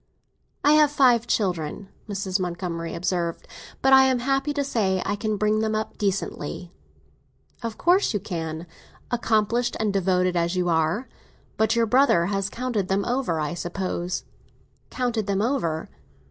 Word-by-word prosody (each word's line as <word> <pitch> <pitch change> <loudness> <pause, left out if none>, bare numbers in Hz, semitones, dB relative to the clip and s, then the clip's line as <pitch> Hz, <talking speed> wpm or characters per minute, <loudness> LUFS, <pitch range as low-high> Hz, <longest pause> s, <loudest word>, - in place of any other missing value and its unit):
"I 290 - +5
have 305 -1 +6
five 245 -5 +4
children," 180 -2 -1 0.2
Mrs. 195 -1 -1
Montgomery 170 -2 -3
observed; 170 -1 -2 0.4
"but 270 0 +5
I 265 0 +8
am 260 -1 +3
happy 270 +3 0
to 285 -1 -1
say 200 -8 0
I 205 - 0
can 215 0 -2
bring 215 +1 +2
them 220 0 0
up 215 0 -4
decently." 185 -4 -3 0.9
"Of 230 -2 -5
course 365 +3 +3
you 205 - -1
can—accomplished 210 +7 -2
and 215 -2 0
devoted 185 -1 +1
as 170 +1 0
you 180 -1 +1
are! 165 +9 +1 0.5
But 220 +1 +2
your 230 -1 +3
brother 235 -7 +4
has 195 +1 -1
counted 235 -6 -2
them 195 +1 0
over, 245 -10 0
I 150 +2 -2
suppose?" 175 0 -3 0.7
"Counted 240 -5 -1
them 200 -1 0
over?" 195 - -1
205 Hz, 145 wpm, -24 LUFS, 175-240 Hz, 0.9 s, I